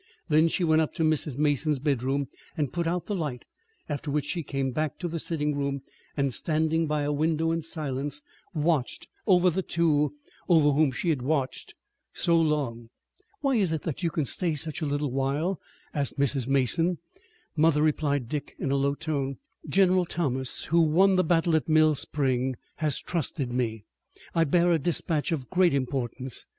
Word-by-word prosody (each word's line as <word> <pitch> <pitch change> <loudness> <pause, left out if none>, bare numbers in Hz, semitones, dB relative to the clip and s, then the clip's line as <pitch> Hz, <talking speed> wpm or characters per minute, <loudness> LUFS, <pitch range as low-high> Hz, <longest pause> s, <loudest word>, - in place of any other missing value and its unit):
Then 155 +1 +5
she 175 - -1
went 160 -1 +4
up 155 - -2
to 160 - 0
Mrs. 155 -4 0
Mason's 150 0 +1
bedroom 135 0 0 0.3
and 145 -5 -1
put 170 -1 -1
out 175 +1 -1
the 210 - -3
light, 150 -10 -3 0.4
after 145 0 -4
which 145 0 0
she 170 +3 -2
came 135 -3 -2
back 155 +3 -2
to 175 - -3
the 165 0 -4
sitting 150 -2 -1
room, 140 -1 -2 0.3
and, 140 -2 0
standing 160 +2 0
by 150 -1 0
a 145 - 0
window 160 +2 +1
in 165 0 -1
silence, 145 -3 -4 0.4
watched 150 -4 0 0.2
over 180 -2 +5
the 190 +3 -1
two 150 -5 +1 0.3
over 155 -4 +5
whom 145 0 +3
she 170 +7 -2
had 145 -6 +1
watched 135 -1 -2 0.4
so 170 - +2
long. 145 -8 0 0.5
"Why 275 -4 +2
is 190 -6 +2
it 160 -2 -2
that 160 +1 -4
you 170 - +1
can 155 -2 -1
stay 165 +4 0
such 155 +2 0
a 155 - -1
little 145 -1 -1
while?" 140 +7 -1 0.3
asked 140 -1 -1
Mrs. 135 -2 +2
Mason. 150 +6 +2 0.6
"Mother," 155 -1 +3
replied 145 -4 +1
Dick 145 +3 -5
in 135 - -2
a 140 - +2
low 140 +1 +1
tone, 140 -4 -3 0.3
"General 185 +1 +4
Thomas, 130 -7 +1
who 170 +1 +3
won 180 +5 +4
the 185 - +3
battle 165 -1 +2
at 160 - 0
Mill 155 0 +5
Spring, 130 -3 0 0.2
has 155 -3 +2
trusted 145 -6 -2
me. 115 -4 -2 0.5
I 165 -1 +3
bear 175 +4 +3
a 165 - +3
dispatch 165 +1 -1
of 140 -6 -3
great 180 -4 +3
importance. 130 -1 -3
150 Hz, 180 wpm, -27 LUFS, 140-165 Hz, 0.6 s, Then